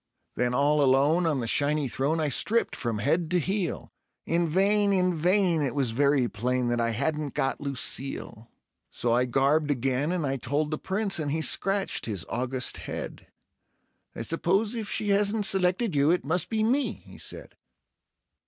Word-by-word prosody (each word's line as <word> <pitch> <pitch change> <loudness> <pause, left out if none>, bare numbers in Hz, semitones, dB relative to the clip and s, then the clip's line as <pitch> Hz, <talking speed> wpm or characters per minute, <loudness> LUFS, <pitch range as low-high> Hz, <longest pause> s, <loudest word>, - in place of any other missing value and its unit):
Then 125 0 -1
all 145 +2 +2
alone 145 +6 +3
on 145 -5 0
the - - -3
shiny 145 +4 +2
throne 140 +6 -1
I 155 -2 0
stripped 230 - +2
from 115 -3 -3
head 155 +9 0
to 180 0 +2
heel; 190 +1 -3 0.3
In 170 +1 +1
vain, 200 +4 +2
in 180 -2 +2
vain; 175 0 +2
it 140 -1 -2
was 135 -5 +1
very 140 +1 +2
plain 125 +3 -1
that 120 0 0
I 115 - +1
hadn't 145 +5 -2
got 135 +2 -1
Lucille. 135 -4 -3 0.4
So 120 -1 -1
I 125 +1 +2
garbed 140 +5 +1
again, 135 +3 0
and 180 -4 -1
I 135 0 -1
told 145 +5 -1
the 155 - -3
Prince, 195 -1 0
and 150 -2 -2
he 160 +3 -1
scratched 195 -3 +1
his 100 -6 -3
august 125 +1 -2
head; - - -7 0.9
"I - - -5
suppose 190 - +1
if 225 -3 -4
she 210 - -1
hasn't 205 +1 +2
selected 190 +2 +2
you, 145 +1 +3
it 175 -2 +1
must 165 +5 0
be 220 -1 0
me," 265 +6 +1
he - - -14
said. - - -9
150 Hz, 175 wpm, -26 LUFS, 135-185 Hz, 0.9 s, alone